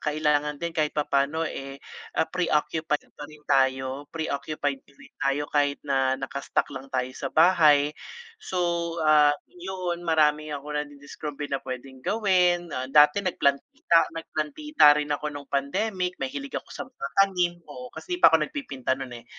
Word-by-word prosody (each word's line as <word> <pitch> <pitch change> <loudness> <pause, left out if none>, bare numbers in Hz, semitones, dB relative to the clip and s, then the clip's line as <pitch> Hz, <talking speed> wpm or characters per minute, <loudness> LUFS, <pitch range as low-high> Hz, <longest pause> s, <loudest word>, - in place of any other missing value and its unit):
kailangan 150 -1 0
din 170 +3 -4
kahit 155 -2 -1
papaano, 145 +2 +1
eh, 135 -3 -6 0.6
pre-occupied 160 -2 0 0.2
pa 145 - -9
rin 150 -1 -16
tayo. 130 +1 +1
Pre-occupied 145 -3 -3
pa - - -25
rin - - -17
tayo 140 +1 +1
kahit 145 -1 +2
na 135 -2 +1
naka-stuck 135 +1 -2
lang 135 0 -8
tayo 130 -1 -2
sa 135 - -5
bahay 155 -3 +5 0.5
so, 190 - -6 0.5
ah, 150 -1 +6 0.2
yun 180 -1 -4
marami 155 -1 +3
ako 145 +1 -8
nadidiskubre 145 0 -6
na 140 - +1
puwedeng 130 +1 -8
gawin. 180 - +2 0.2
Dati 150 +5 +6
nagplantita, 175 - +1
nagplantita 160 - +3
rin 150 0 -2
ako 150 +1 -2
nung 145 -2 -9
pandemic 180 +6 -1
mahilig 280 +1 -5
ako - - -6
sa - - -5
mga - - -7
tanim, 185 -3 +3
oo 255 0 -9
kasi 360 - -6
di 355 - -7
pa - - +9
ako 160 - +5
nagpipinta 135 - -3
no'n, 135 -1 -7
eh. 115 - -16
150 Hz, 150 wpm, -26 LUFS, 140-175 Hz, 0.6 s, pa